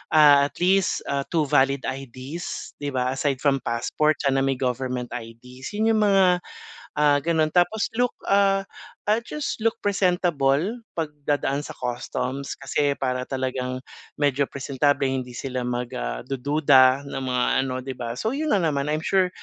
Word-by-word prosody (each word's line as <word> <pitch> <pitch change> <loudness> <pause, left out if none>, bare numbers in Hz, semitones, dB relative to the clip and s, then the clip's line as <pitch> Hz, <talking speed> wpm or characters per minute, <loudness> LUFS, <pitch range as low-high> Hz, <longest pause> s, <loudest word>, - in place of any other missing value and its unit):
ah, 145 -2 +7
at - - -19
least, 190 +1 +2
ah, 140 0 0
2 165 -3 +1
valid 135 0 +2
IDs 135 +5 -6
'di 145 -1 -3
ba, 125 0 +1
aside 135 0 -1
from 140 -2 +3
passport 140 +6 +1
sana 135 -1 +2
may 135 0 +1
government 125 -1 -2
IDs. 125 - -8
Yun 220 +2 +2
yung 215 - +2
mga, 195 -1 +5 0.7
ah, 145 -1 +4
gano'n 160 0 +2
tapos 180 +5 +3
look, 245 0 +2 0.2
ah, 195 0 +3 0.4
ah, 215 +2 +3
just 300 +4 -3
look 225 - +1
presentable 175 -8 +2 0.4
'pag 160 -2 0 0.2
dadaan 145 -1 +1
sa - - -7
customs 125 +2 -3
kasi 140 +1 0
para 125 -1 -1
talagang 130 -1 -2 0.4
medyo 145 -1 +2
presentable 140 +1 0
hindi 130 -2 -3
sila 130 -1 -3
mag, 125 0 -2
ah, - - -3
dududa 135 -1 +4
ng 135 - -4
mga 125 -1 +1 0.2
ano, 130 -1 -3
'di 130 +1 -6
ba? 120 -2 -4
So, 220 +4 -1
yun 310 +1 -1
lang 195 -4 +2
naman. 140 -1 -1
I'm 155 +1 -1
sure 190 -1 +3
140 Hz, 165 wpm, -24 LUFS, 130-160 Hz, 0.7 s, ah